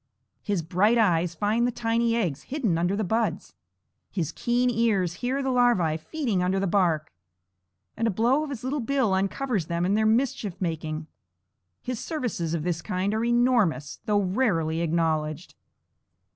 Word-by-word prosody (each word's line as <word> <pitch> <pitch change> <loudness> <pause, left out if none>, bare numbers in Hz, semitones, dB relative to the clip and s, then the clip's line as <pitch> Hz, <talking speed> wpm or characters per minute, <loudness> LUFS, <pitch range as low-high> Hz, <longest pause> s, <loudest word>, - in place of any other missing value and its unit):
His 200 -5 -1
bright 195 +8 +2
eyes 175 -6 +2
find 215 +6 +1
the - - 0
tiny 230 0 0
eggs 170 -11 -1
hidden 255 - 0
under 175 +3 +1
the 215 - -1
buds; 225 +4 -1 0.6
his 170 -6 -2
keen 245 +1 0
ears 210 -7 +1
hear 260 +3 -1
the 265 - 0
larvæ 235 -11 +2
feeding 230 - -2
under 185 +2 +1
the 195 - 0
bark, 170 - +1 0.8
and 230 - 0
a - - +2
blow 235 +9 +2
of 305 - -5
his 260 -5 -6
little 275 +3 -1
bill 255 -4 +1
uncovers 195 - -1
them 170 +1 -1
in 190 - +1
their 215 +1 +3
mischief 220 -5 0
making. 160 -3 -3 0.8
His 250 -2 -4
services 230 - -2
of 155 - -3
this 175 -1 -1
kind 185 +5 -1
are 220 +1 0
enormous, 235 - +2
though 205 -1 +2
rarely 180 -6 0
acknowledged. 160 -1 -1
205 Hz, 160 wpm, -26 LUFS, 170-240 Hz, 0.8 s, their